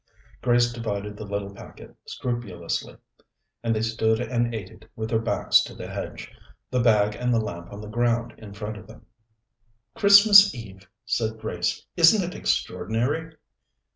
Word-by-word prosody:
Grace 120 -1 +2
divided 105 -3 -4
the 105 - -8
little 100 0 -4
packet 100 - -13
scrupulously, 110 -9 -4 0.6
and 115 -1 0
they 110 - -1
stood 110 0 +1
and 120 -1 -1
ate 110 -4 -6
it 110 - -18
with 110 0 -5
their 110 - +2
backs 115 - +3
to - - -7
the - - -8
hedge, - - -7 0.4
the 125 - +1
bag 105 -3 +3
and 125 +4 -2
the 115 - +3
lamp 85 -6 -6
on 100 - -8
the 105 - -9
ground 120 +1 0
in 105 -2 -11
front 105 +1 -6
of - - -13
them. 110 0 -15 0.9
"Christmas 200 -3 +7
Eve!" 95 -5 -11 0.2
said 110 -1 -1
Grace. 90 -5 -3
"Isn't 175 +4 +6
it 180 - -7
extraordinary?" 135 - -2
110 Hz, 160 wpm, -24 LUFS, 105-120 Hz, 0.9 s, Christmas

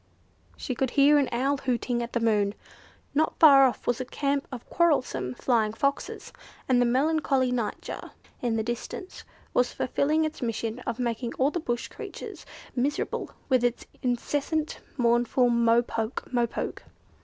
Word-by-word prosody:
She 260 - -3
could 260 +1 0
hear 290 +1 +7
an 275 - +1
owl 270 +4 +1
hooting 245 -2 -1
at 235 0 -5
the 235 - +1
moon. 210 -3 +2 0.6
Not 310 +2 +1
far 275 -4 +8
off 250 - -4
was 245 +1 0
a - - -3
camp 280 +2 -1
of 250 -3 -8
quarrelsome 255 - +1
Flying 220 -4 +1
Foxes, 275 +5 -2 0.3
and 250 -2 +4
the 245 - +3
melancholy 270 0 +2
Nightjar 235 -4 -3 0.3
in 235 -2 0
the 220 - 0
distance 240 - -6 0.3
was 250 0 +2
fulfilling 305 +5 +1
its 310 - -5
mission 230 0 -2
of 235 -2 -2
making 235 -1 -2
all 270 +3 +2
the 350 - -2
bush 240 -7 -2
creatures - - -9 0.3
miserable 275 +3 -1 0.2
with 255 -3 +3
its 245 0 0 0.2
incessant, 290 +5 -1 0.2
mournful 240 0 +3
"mo 235 0 +4
poke! 225 0 -3
mo 240 -1 +2
poke!" - - -5
250 Hz, 155 wpm, -27 LUFS, 235-280 Hz, 0.6 s, far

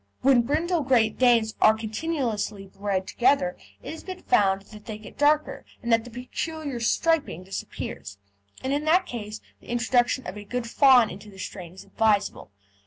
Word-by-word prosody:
When 260 -2 +6
brindle 320 +7 0
Great 245 -5 +2
Danes 235 -3 +4
are 215 - +6
continuously 220 -4 -3
bred 195 -1 -3
together, 270 +3 +2 0.3
it - - -6
has 320 - -10
been 370 -1 -8
found 195 -1 +2
that 210 +1 -14
they 215 -2 -5
get 215 - -13
darker, 300 +1 +2 0.2
and 235 0 +1
that 225 0 +3
the - - -9
peculiar 270 +3 -5
"striping" 290 - +1
disappears, 185 - -7 0.5
and 265 +1 -1
in 290 +1 0
that 345 +4 +4
case 215 -2 -6 0.2
the - - -17
introduction 240 +1 +1
of 185 +3 -6
a 205 - -7
good 245 +3 -4
fawn 250 -3 +5
into 205 +2 -10
the 195 - -15
strain 180 -2 -7
is 190 - -11
advisable. 205 - 0
235 Hz, 175 wpm, -25 LUFS, 210-275 Hz, 0.5 s, When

